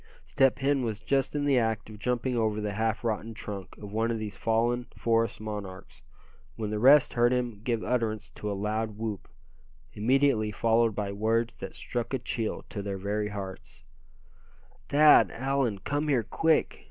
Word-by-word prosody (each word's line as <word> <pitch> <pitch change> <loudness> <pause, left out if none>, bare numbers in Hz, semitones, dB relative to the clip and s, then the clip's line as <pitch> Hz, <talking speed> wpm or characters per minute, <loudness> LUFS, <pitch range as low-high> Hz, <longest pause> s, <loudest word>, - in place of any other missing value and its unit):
Step 135 -1 +3
Hen 135 -1 +1
was 110 -3 -3
just 135 +1 0
in 145 -1 0
the 140 -3 +4
act 110 -2 -1
of 110 -1 -11
jumping 125 +2 -1
over 110 -2 0
the 105 -1 -3
half 110 +2 -1
rotten 115 0 -2
trunk 100 -3 -7
of 105 -1 -9
one 115 +1 +1
of 115 - -1
these 105 -3 -5
fallen 120 +3 0
forest 115 -2 +1
monarchs, 105 -3 -7 0.5
when 105 -2 -4
the 105 - -1
rest 135 +4 +6
heard 120 0 +3
him 120 -5 -1
give 115 -2 -1
utterance 110 -4 -1
to 105 - -5
a 100 - -3
loud 105 +1 -2
whoop, 110 -3 -4 0.7
immediately 120 -1 +2
followed 115 +1 +2
by 100 -2 -2
words 115 +3 0
that - - -8
struck 120 +2 -3
a - - +1
chill 115 -2 -3
to 100 - -5
their 100 -1 -4
very 105 +2 -2
hearts: 100 -2 -8 1.1
"Thad! 150 +1 +7
Allan! 135 -4 -1
come 145 +8 -2
here, 130 -6 +2
quick! 160 +8 +1
115 Hz, 175 wpm, -28 LUFS, 105-125 Hz, 1.1 s, Thad